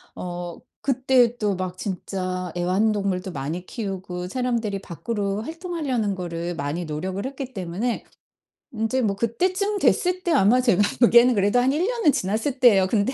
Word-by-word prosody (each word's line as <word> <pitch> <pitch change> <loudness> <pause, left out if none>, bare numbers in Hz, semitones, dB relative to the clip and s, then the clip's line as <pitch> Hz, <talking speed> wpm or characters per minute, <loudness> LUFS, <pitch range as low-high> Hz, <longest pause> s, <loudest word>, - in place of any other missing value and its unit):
어 175 -1 -6 0.3
그때도 245 -5 +2
막 185 -1 -4
진짜 185 -2 -4
애완동물도 190 +1 0
많이 155 +5 -4
키우고 185 -4 -5
사람들이 235 -2 -1
밖으로 200 +2 -3
활동하려는 305 - -2
거를 175 -1 -4
많이 160 +3 -3
노력을 185 +7 -4
했기 265 -1 -6
때문에 190 +6 -2 0.8
이제 255 +4 +1
뭐 205 -4 +1
그때쯤 370 - 0
됐을 365 -1 +2
때 345 - 0
아마 245 -2 +5
제가 230 -6 +3 0.2
보기에는 240 +1 +6
그래도 205 +4 +3
한 255 +2 +3
1 325 +7 +1
년은 465 -10 +3
지났을 225 +5 -1
때예요. 205 -7 +6
근데 210 +5 +1
210 Hz, 330 characters per minute, -24 LUFS, 185-255 Hz, 0.8 s, 보기에는